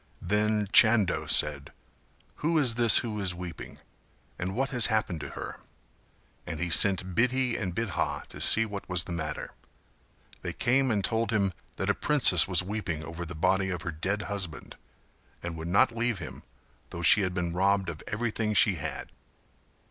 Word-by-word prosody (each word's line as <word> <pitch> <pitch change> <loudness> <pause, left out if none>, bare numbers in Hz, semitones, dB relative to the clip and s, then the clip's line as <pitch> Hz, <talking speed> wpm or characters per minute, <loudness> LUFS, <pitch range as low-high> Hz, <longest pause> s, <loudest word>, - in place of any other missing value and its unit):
Then 105 +2 0
Chando 110 -5 +4
said 70 -2 0 0.7
"who 165 +2 -1
is 130 -6 +2
this 115 -1 +7
who 105 -2 -5
is 95 -3 +1
weeping 90 -2 -9 0.6
and 95 +2 -4
what 135 +3 -2
has 120 -3 +6
happened 110 -7 -2
to - - -7
her?" - - -8 0.9
And 80 -3 -6
he 85 0 -3
sent 95 0 +5
Bidhi 125 +2 0
and 90 -4 -5
Bidha 115 -6 -3
to - - -10
see 110 - +5
what 100 -3 -9
was 90 -2 0
the - - -10
matter; 80 -3 -5 0.9
they - - -5
came 130 +2 0
and 105 -4 -1
told 115 -1 -2
him 100 -4 -1 0.2
that - - -4
a - - -1
princess 125 - +4
was 90 -2 +2
weeping 90 -6 -5
over 85 +1 -8
the 85 - -9
body 95 +4 0
of 90 -2 -5
her 85 - -4
dead 100 +7 -4
husband 95 -6 -5 0.7
and 85 -1 -6
would 80 0 -7
not 100 +6 +2
leave 120 -1 -2
him - - -9 0.5
though 85 - -8
she 100 +6 +6
had 90 -2 -3
been 85 -2 -3
robbed 95 +2 0
of 80 -2 -7
everything 110 -1 -3
she 100 -3 +4
had. 75 -2 -7
100 Hz, 175 wpm, -27 LUFS, 85-110 Hz, 0.9 s, this